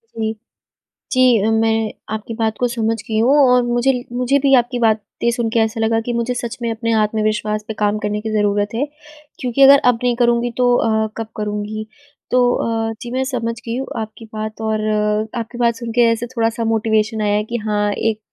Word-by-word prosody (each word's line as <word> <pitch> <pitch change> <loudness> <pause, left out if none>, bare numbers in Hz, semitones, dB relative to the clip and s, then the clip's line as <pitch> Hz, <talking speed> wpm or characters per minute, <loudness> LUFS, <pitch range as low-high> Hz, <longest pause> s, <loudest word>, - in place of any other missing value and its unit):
जी। 220 -1 -2 0.8
जी, 255 -4 +4
मैं 225 0 +1 0.2
आपकी 220 +1 -5
बात 220 -1 0
को 245 - +2
समझ 225 -2 -1
गई 220 -1 0
हूँ। 250 +6 +4 0.2
और 250 0 +4
मुझे 240 +2 +2 0.2
मुझे 250 +3 +1
भी 275 0 +2
आपकी 245 0 +1
बातें 225 0 0
सुन 235 -1 -1
के 230 - +3
ऐसा 220 +1 0
लगा 225 0 +2
कि 240 - -2
मुझे 235 +1 -1
सच 240 -2 -5
में 235 - -1
अपने 230 +1 -2
आत्मविश्वास 215 0 -1
पे 220 - -3
काम 210 0 +1
करने 210 0 -2
की 220 - -4
ज़रूरत 205 0 0
है। 260 +5 0 0.5
क्योंकि 250 +1 -1
अगर 275 +1 +9
अब 235 -2 +1
नहीं 245 -1 +2
करूँगी 240 0 +2
तो 245 -1 +3
अ, 220 -2 +1
कब 225 -1 -4
करूँगी। 210 +1 -4 0.4
तो 250 0 +4 0.5
अ, - - -3
जी 240 -2 -7
मैं 260 +1 0
समझ 230 -4 -2
गई 230 +1 -3
हूँ 270 - -4
आपकी 220 +1 -8
बात 215 0 -5
और 220 -1 -1
अ, 215 +1 0
आपकी 235 +1 -6
बात 235 -1 +2
सुन 230 0 -6
के 240 +2 +2
ऐसे 230 +1 -2
थोड़ा-सा 230 +1 0
मोटिवेशन 220 0 +1
आया 205 -1 +1
है 210 - +1
कि 235 +2 -4
हाँ, 210 -1 +1
एक 215 +1 -1
225 Hz, 205 wpm, -19 LUFS, 215-240 Hz, 0.8 s, अगर